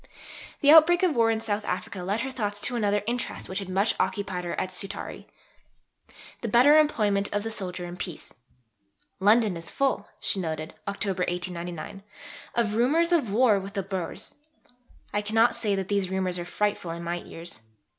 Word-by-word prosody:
The 285 - +6
outbreak 335 +3 +7
of 345 -6 +3
war 230 -1 +4
in 225 -1 +1
South 215 -2 -2
Africa 210 -2 -4
led 200 +5 -1
her 265 +1 -3
thoughts 205 -5 -2
to 250 - 0
another 205 -3 +1
interest 240 +2 -3
which 190 +2 -2
had 195 -2 -6
much 195 +4 +2
occupied 190 -4 -1
her 170 - -3
at 185 - -2
Scutari 195 +2 -3 1.1
the 235 - -2
better 250 +7 +6
employment 210 -10 +2
of 205 0 -1
the 225 - -3
soldier 180 -4 -3
in 175 0 -7
peace: 175 -3 -7 0.9
"London 210 0 +4
is 165 0 -4
full," 270 -7 0
she 195 - 0
noted 160 -3 -4
(October 200 -2 -2
1899), 175 +1 -4 0.5
"of 230 -3 +1
rumours 300 +10 +2
of 315 -10 +2
war 220 -2 +4
with 195 +2 -8
the 195 - -1
Boers. 185 -3 -4 0.8
I 205 - +1
cannot 225 +3 +3
say 205 -3 +1
these 195 0 -1
rumours 185 -1 -1
are 175 - -4
frightful 205 0 -1
in 170 +1 -5
my 170 +1 -2
ears. 165 -9 -7
205 Hz, 175 wpm, -27 LUFS, 185-230 Hz, 1.1 s, outbreak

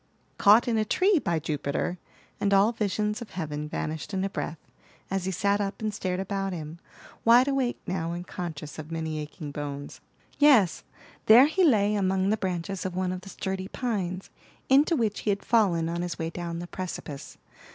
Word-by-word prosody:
"Caught 215 +5 +6
in 230 -2 +1
a - - +3
tree, 370 - +3
by 170 - 0
Jupiter!" 150 +3 -2 0.4
and 200 -1 +2
all 200 +3 +5
visions 210 0 -1
of 235 - -7
heaven 150 -3 -4
vanished 155 +5 -4
in 190 - 0
a 195 - -2
breath, 150 0 -4 0.5
as 195 -2 -1
he 190 - -1
sat 200 +3 +1
up 200 0 -3
and 215 -1 -2
stared 185 -2 -2
about 195 0 -2
him, 160 0 -7 0.4
wide 240 +3 +6
awake 270 -3 0
now, 170 -2 -2
and 175 +1 -5
conscious 155 -5 -6
of 155 +1 -8
many 160 -1 -3
aching 150 0 -7
bones. 145 -1 -6 0.4
Yes, 265 - +5 0.4
there 235 +5 +9
he 345 +6 +1
lay 210 - +4
among 190 -1 +1
the - - +3
branches 185 0 -3
of 185 -1 -4
one 185 0 0
of 185 0 -5
the 195 - -11
sturdy 190 0 -4
pines, 195 -7 -3 0.4
into 285 +5 +5
which 220 -6 0
he - - -2
had 200 0 -1
fallen 185 -8 +3
on 170 +1 -2
his 175 -1 -4
way 165 0 -3
down 170 -1 -5
the 175 - -5
precipice. 175 -6 -7
190 Hz, 190 wpm, -27 LUFS, 165-210 Hz, 0.5 s, there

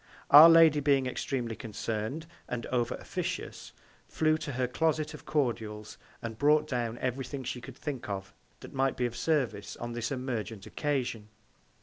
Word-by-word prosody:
Our 150 +3 +11
Lady 165 -2 +7
being 140 -2 +3
extremely 125 -2 -3
concern'd, 115 +7 -4 0.2
and 120 -1 -3
over 120 -2 0
officious, - - -5 0.4
flew 155 0 +2
to 150 -3 -5
her 125 0 0
Closet 155 +3 0
of - - -11
Cordials, 110 -7 -2 0.2
and 115 -1 -6
brought 150 +1 +4
down 120 -4 -2
every 130 +2 -2
Thing 135 +1 -6
she 125 0 -4
could 125 +1 -10
think 135 -7 -5
of 95 -1 -5 0.3
that - - -11
might 135 0 0
be 125 - +1
of 120 -1 -3
Service 135 -11 -1
on 120 0 -5
this 120 +1 -3
emergent 120 -6 -4
Occasion. 125 -7 -2
125 Hz, 160 wpm, -30 LUFS, 115-145 Hz, 0.4 s, Our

